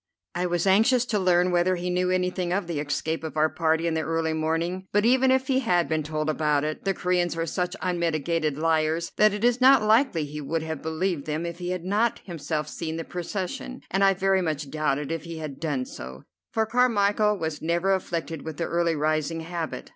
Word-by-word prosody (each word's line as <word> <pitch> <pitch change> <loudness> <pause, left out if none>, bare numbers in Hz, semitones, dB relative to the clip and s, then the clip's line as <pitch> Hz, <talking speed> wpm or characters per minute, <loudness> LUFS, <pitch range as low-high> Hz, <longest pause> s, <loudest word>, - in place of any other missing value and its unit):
I 180 +1 -1
was 175 +1 0
anxious 225 +6 +4
to 215 -4 0
learn 180 -1 +3
whether 175 +1 +2
he 180 0 -3
knew 180 0 +1
anything 180 -1 0
of 195 +1 0
the 170 -3 -3
escape 155 +3 -2
of 160 -1 -6
our 155 +1 +4
party 160 0 0
in 165 - +1
the 160 - 0
early 160 0 -1
morning; 165 +4 -1
but 205 +1 +2
even 260 +2 +4
if 260 0 +3
he 260 0 +2
had 180 -9 +1
been 160 -1 0
told 155 0 -3
about 150 -2 +1
it, 155 +4 -4
the 195 -1 +1
Coreans 175 -2 0
are 165 - 0
such 180 +3 -2
unmitigated 165 -4 0
liars 160 +1 +1
that 215 0 +5
it 205 +2 -4
is 245 +1 +3
not 260 -2 +7
likely 215 - +3
he 150 +1 -7
would 160 +3 -2
have 160 -2 -5
believed 160 -1 -2
them 155 +2 -2
if 170 0 -6
he 175 0 -4
had 180 -1 -3
not 210 +5 +1
himself 155 -3 -3
seen 160 +1 -5
the 165 - -3
procession, 185 +8 -5
and 195 +1 +2
I 195 0 +5
very 195 0 +2
much 150 -4 -3
doubted 150 -1 -1
if 165 0 -4
he 165 -1 -7
had 150 -4 -6
done 145 -6 -2
so, 65 - -9 0.3
for 220 0 +1
Carmichel 210 -3 +2
was 160 -4 -4
never 170 +4 +1
afflicted 165 -4 -3
with 160 -2 -7
the 170 - -1
early 170 -1 +1
rising 155 +1 0
habit. 165 -1 -5
170 Hz, 215 wpm, -26 LUFS, 155-190 Hz, 0.3 s, not